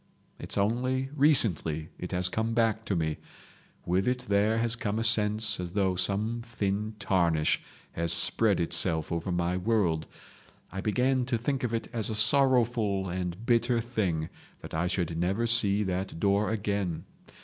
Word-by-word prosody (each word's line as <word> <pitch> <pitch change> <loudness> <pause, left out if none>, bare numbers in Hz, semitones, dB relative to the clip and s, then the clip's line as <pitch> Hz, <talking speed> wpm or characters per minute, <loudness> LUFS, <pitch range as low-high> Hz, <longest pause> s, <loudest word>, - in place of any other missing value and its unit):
It's - - -4
only 130 +6 0
recently 105 - +2
it 90 - -6
has 90 0 +2
come 110 +4 -2
back 115 -1 +1
to 100 - -1
me. 80 -2 -1 0.7
With 90 +4 0
it 125 0 -1
there 105 +2 +2
has 115 0 +1
come 105 -3 -3
a 115 - -1
sense 110 -1 +3
as 90 -1 -5
though 95 -3 +1
some 105 +6 +1
thin 105 -2 -3
tarnish 85 -6 +1 0.3
had 85 0 -3
spread 100 +5 +3
itself 80 -1 0
over 85 +2 -2
my 90 +1 -1
world. 90 -6 0 0.6
I 95 - -5
began 125 +5 +1
to 120 -2 -1
think 130 +3 -2
of 120 - -1
it 115 -1 -3
as 115 -2 -2
a 110 - -3
sorrowful 110 -5 +2
and 90 +3 -4
bitter 120 0 +2
thing 100 -10 -2 0.3
that - - -10
I 80 +3 0
should 85 -2 -2
never 95 +7 0
see 105 -3 +3
that 95 -2 -4
door 100 +2 +1
again. 100 -5 -2
105 Hz, 160 wpm, -28 LUFS, 90-115 Hz, 0.7 s, sense